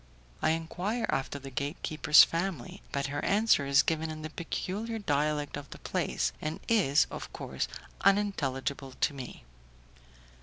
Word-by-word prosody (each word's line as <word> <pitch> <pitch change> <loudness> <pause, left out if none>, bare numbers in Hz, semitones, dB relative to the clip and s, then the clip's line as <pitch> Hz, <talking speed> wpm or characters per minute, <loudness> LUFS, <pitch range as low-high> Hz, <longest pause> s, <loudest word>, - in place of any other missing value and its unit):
I - - +3
enquire 175 +8 -1
after 135 +1 -1
the 135 -1 -9
gatekeeper's 150 +3 +4
family, 170 -6 -3
but 140 0 -1
her 145 +1 -3
answer 200 -8 +3
is 140 0 +5
given 160 0 0
in 155 -1 -6
the 155 - -5
peculiar 205 +7 -3
dialect 150 -6 0
of 145 -1 -8
the - - -9
place, - - -1
and 155 +1 -3
is, 185 -11 +4
of - - -7
course, - - -3 0.4
unintelligible 140 -9 +1
to 145 - 0
me. 130 -3 -8
155 Hz, 145 wpm, -30 LUFS, 140-185 Hz, 0.4 s, is